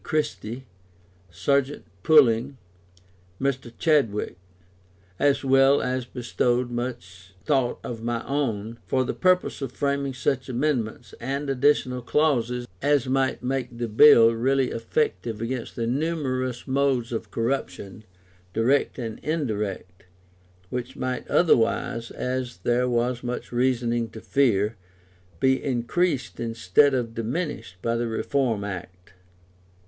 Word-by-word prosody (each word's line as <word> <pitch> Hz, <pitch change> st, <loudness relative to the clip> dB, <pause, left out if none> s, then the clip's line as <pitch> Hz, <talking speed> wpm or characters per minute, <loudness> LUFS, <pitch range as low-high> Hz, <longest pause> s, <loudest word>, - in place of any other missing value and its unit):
Christie, 130 Hz, -5 st, -3 dB, 0.6 s
Serjeant 140 Hz, -, 0 dB, 0.2 s
Pulling, 135 Hz, -, +4 dB, 0.8 s
Mr. 130 Hz, -3 st, -2 dB
Chadwick 135 Hz, -, +1 dB, 0.8 s
as 145 Hz, 0 st, +2 dB
well 135 Hz, +1 st, +5 dB
as 125 Hz, 0 st, -2 dB
bestowed 120 Hz, 0 st, -1 dB
much 95 Hz, -7 st, -6 dB
thought 135 Hz, -5 st, +1 dB
of 115 Hz, -2 st, -6 dB
my 120 Hz, 0 st, -2 dB
own, 115 Hz, -5 st, -2 dB
for 130 Hz, -, +2 dB
the -, -, -2 dB
purpose 185 Hz, -4 st, +1 dB
of 135 Hz, -3 st, -3 dB
framing 140 Hz, 0 st, -1 dB
such 130 Hz, 0 st, -1 dB
amendments 120 Hz, -3 st, -2 dB
and 140 Hz, +3 st, -2 dB
additional 130 Hz, -2 st, +2 dB
clauses 125 Hz, -3 st, +1 dB
as 145 Hz, -2 st, +2 dB
might 130 Hz, -1 st, 0 dB
make 125 Hz, -2 st, -2 dB
the 120 Hz, 0 st, -2 dB
Bill 115 Hz, 0 st, +7 dB
really 130 Hz, +3 st, +1 dB
effective 115 Hz, -3 st, -1 dB
against 120 Hz, +1 st, -4 dB
the 115 Hz, -, -2 dB
numerous 130 Hz, -2 st, -2 dB
modes 130 Hz, -3 st, +1 dB
of 115 Hz, -, -4 dB
corruption, 110 Hz, -5 st, -3 dB, 0.5 s
direct 125 Hz, +6 st, +1 dB
and 115 Hz, -4 st, -5 dB
indirect, 105 Hz, -, -3 dB, 0.7 s
which 125 Hz, -1 st, -4 dB
might 130 Hz, 0 st, -3 dB
otherwise, 115 Hz, -6 st, +2 dB
as 125 Hz, -1 st, -3 dB
there 125 Hz, +1 st, +2 dB
was 120 Hz, 0 st, 0 dB
much 125 Hz, 0 st, -4 dB
reason 120 Hz, -2 st, 0 dB
to 110 Hz, -, -10 dB
fear, 110 Hz, -5 st, +1 dB, 0.6 s
be 130 Hz, +3 st, +2 dB
increased 135 Hz, +4 st, -1 dB
instead 115 Hz, +4 st, +2 dB
of 120 Hz, -3 st, -2 dB
diminished 120 Hz, -, -4 dB
by 115 Hz, 0 st, 0 dB
the 120 Hz, 0 st, -1 dB
Reform 115 Hz, -1 st, 0 dB
Act. 90 Hz, -2 st, -8 dB
125 Hz, 120 wpm, -25 LUFS, 115-135 Hz, 0.8 s, Bill